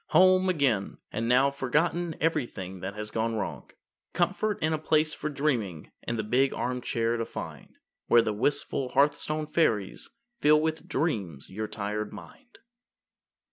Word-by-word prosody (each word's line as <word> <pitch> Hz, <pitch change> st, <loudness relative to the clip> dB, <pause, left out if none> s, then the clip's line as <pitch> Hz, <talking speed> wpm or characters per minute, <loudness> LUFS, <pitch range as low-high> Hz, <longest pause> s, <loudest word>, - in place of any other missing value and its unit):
Home 185 Hz, 0 st, +5 dB
again! 135 Hz, -, +1 dB
And 115 Hz, +2 st, -2 dB
now 130 Hz, +3 st, +5 dB
forgotten 160 Hz, +5 st, 0 dB
Everything 120 Hz, -, -2 dB
that 95 Hz, +2 st, -5 dB
has 105 Hz, 0 st, -6 dB
gone 115 Hz, 0 st, -1 dB
wrong. 110 Hz, -, -4 dB, 0.4 s
Comfort 215 Hz, -1 st, +1 dB
and 155 Hz, +1 st, +1 dB
a 155 Hz, -, 0 dB
place 155 Hz, 0 st, +2 dB
for 150 Hz, -, -4 dB
dreaming 120 Hz, -, -1 dB, 0.2 s
In 115 Hz, -, 0 dB
the 110 Hz, -, -1 dB
big 130 Hz, +5 st, +2 dB
armchair 120 Hz, -2 st, -1 dB
to 115 Hz, -, -2 dB
find -, -, -8 dB, 0.3 s
Where 120 Hz, -1 st, +6 dB
the 110 Hz, -, -1 dB
wistful 130 Hz, +3 st, 0 dB
hearthstone 150 Hz, +2 st, +2 dB
fairies 115 Hz, -, 0 dB, 0.3 s
Fill 150 Hz, -3 st, +5 dB
with 160 Hz, +1 st, -2 dB
dreams 100 Hz, -, -2 dB
your 110 Hz, +3 st, -3 dB
tired 105 Hz, 0 st, -3 dB
mind. 255 Hz, -3 st, -13 dB
130 Hz, 145 wpm, -28 LUFS, 110-155 Hz, 0.4 s, Where